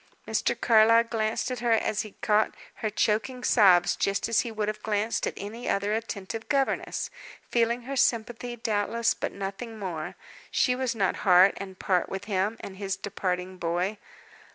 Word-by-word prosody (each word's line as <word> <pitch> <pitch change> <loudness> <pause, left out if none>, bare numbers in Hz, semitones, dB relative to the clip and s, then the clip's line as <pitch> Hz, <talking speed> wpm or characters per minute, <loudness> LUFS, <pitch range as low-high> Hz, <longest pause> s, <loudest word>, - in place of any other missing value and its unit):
Mr. - - 0
Carlyle 230 0 +6
glanced 225 +1 -1
at 250 - -3
her 235 0 +2
as 215 -1 +1
he 215 -2 -9
caught 215 0 +2 0.2
her 215 - -2
choking 225 +4 0
sobs 185 -8 +5
just 200 0 0
as 230 -1 +2
he 235 - -1
would 215 -1 -2
have 215 0 -3
glanced 215 +1 -1
at - - -3
any 225 +5 -6
other 200 +1 0
attentive 225 0 -4
governess 275 -2 0 0.4
feeling 235 +1 +1
her 275 +3 -5
sympathy, 240 -1 0
doubtless, 225 0 0
but - - -4
nothing 200 +4 -6
more; 175 -5 -5 0.3
she 250 - +2
was 255 -1 -1
not 195 -4 +1
heart 185 0 +6
and 190 -1 -8
part 185 -2 0
with 195 0 -5
him 205 +2 0
and 190 -1 -8
his 195 -1 -2
departing 185 -2 -3
boy. 175 +5 -1
215 Hz, 170 wpm, -27 LUFS, 195-230 Hz, 0.4 s, Carlyle